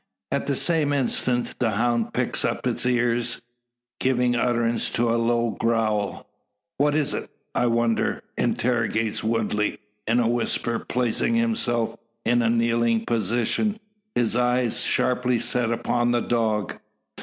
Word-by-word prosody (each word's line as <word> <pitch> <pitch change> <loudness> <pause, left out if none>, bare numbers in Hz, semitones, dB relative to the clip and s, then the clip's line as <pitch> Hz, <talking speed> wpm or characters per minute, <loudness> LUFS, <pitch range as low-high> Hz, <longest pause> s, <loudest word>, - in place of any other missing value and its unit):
At - - -1
the 140 - +1
same 155 -1 +2
instant, 125 -2 -1
the 120 - +2
hound 120 +1 0
pricks - - -1
up - - -2
its - - +1
ears, 120 -1 +1 0.6
giving 125 -1 +2
utterance 120 -1 +1
to 115 0 +1
a 115 - +1
low 120 0 +1
growl. 110 -3 -1 0.5
"What 145 +1 +3
is't, 150 -2 -1 0.2
I 125 - +1
wonder?" 115 -1 0
interrogates 115 -3 0
Woodley, 110 -2 0 0.3
in 115 +2 +3
a 120 - +2
whisper, 115 0 0
placing 125 - 0
himself 120 - 0 0.3
in 120 +1 +3
a 115 - +2
kneeling 115 -1 +1
posture, 120 - 0 0.4
his 120 -1 +2
eyes 125 -1 +2
sharply 125 -1 +1
set 120 0 +1
upon 120 +1 0
the 120 0 +2
dog. 110 -4 -1
120 Hz, 130 wpm, -24 LUFS, 115-125 Hz, 0.6 s, What